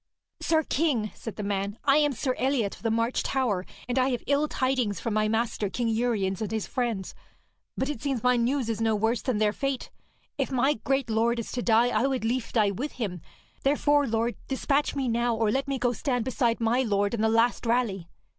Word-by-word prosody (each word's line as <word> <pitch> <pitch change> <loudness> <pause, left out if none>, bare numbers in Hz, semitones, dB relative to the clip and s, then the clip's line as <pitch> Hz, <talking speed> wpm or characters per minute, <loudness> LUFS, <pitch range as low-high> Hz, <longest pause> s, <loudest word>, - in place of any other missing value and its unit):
'Sir 320 -1 +2
king,' 270 -9 0
said 225 -4 -8
the 210 - -5
man, 200 +1 -2
'I 280 0 +4
am 295 -1 +3
Sir 260 0 -1
Eliot 255 -6 +1
of - - -18
the 230 - 0
March 230 +2 +1
Tower, 225 -9 -1 0.2
and 250 +1 0
I 255 +1 +3
have 245 -3 -2
ill 285 +2 +2
tidings 255 - 0
for 230 - -3
my 215 0 +2
master, 220 -2 0
King 235 +3 -1
Uriens, 220 -5 0
and 215 - -2
his 220 -2 -1
friends, 235 -7 -2 0.6
but 265 - 0
it 290 -6 -4
seems 270 -5 -2
my 250 0 +4
news 245 +1 +1
is 225 -1 -2
no 225 -1 +2
worse 225 +3 +1
than 255 -5 -1
their 210 -1 +2
fate. 275 0 -3 0.5
If - - 0
my 265 +3 +3
great 270 +1 -1
lord 230 +2 +2
is 230 - -4
to 245 - -2
die, 235 +1 +4
I 255 - +2
would 260 -4 -1
lief 240 +1 -1
die 210 -4 +3
with 260 +10 -4
him. 195 -8 -4 0.4
Therefore, 290 0 +3
lord, 230 +1 0
despatch 275 +2 0
me 270 -2 -1
now, 235 0 +1
or 220 -1 +1
let 270 +4 0
me 275 -1 -1
go 245 -1 +1
stand 245 -1 -1
beside 240 -3 +1
my 230 +2 +2
lord 205 -3 +1
in 230 - -1
the 220 - +3
last 230 +1 +2
rally.' 215 -8 0
235 Hz, 220 wpm, -27 LUFS, 220-265 Hz, 0.6 s, I